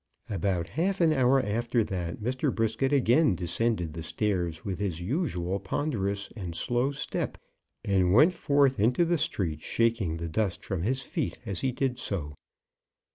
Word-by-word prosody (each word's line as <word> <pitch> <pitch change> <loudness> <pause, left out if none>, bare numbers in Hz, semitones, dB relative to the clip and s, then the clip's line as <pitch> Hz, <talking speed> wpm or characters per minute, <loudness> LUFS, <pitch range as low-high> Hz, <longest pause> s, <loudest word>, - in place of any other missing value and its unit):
About 95 -4 -1
half 185 +7 0
an 165 -3 +4
hour 135 -1 +4
after 120 +1 0
that, 90 -4 -4
Mr. 130 +5 0
Brisket 115 +4 0
again 130 - +4
descended 90 -1 -1
the 80 - -6
stairs 85 -2 -2
with 95 -3 -3
his 95 -5 -2
usual 95 - -1
ponderous 100 -3 -2
and 90 -6 -5
slow 120 +7 0
step, 140 - -3 0.5
and 95 -2 +3
went 150 - +6
forth 140 - +2
into 125 - +3
the 170 -1 +1
street, 90 - -1
shaking 115 -8 0
the 85 0 -4
dust 95 +3 -1
from 95 -4 -2
his 130 +8 0
feet 155 +2 -3
as 100 -5 -3
he 130 - +1
did 125 0 -1
so. 85 -11 -3
110 Hz, 160 wpm, -28 LUFS, 90-135 Hz, 0.5 s, went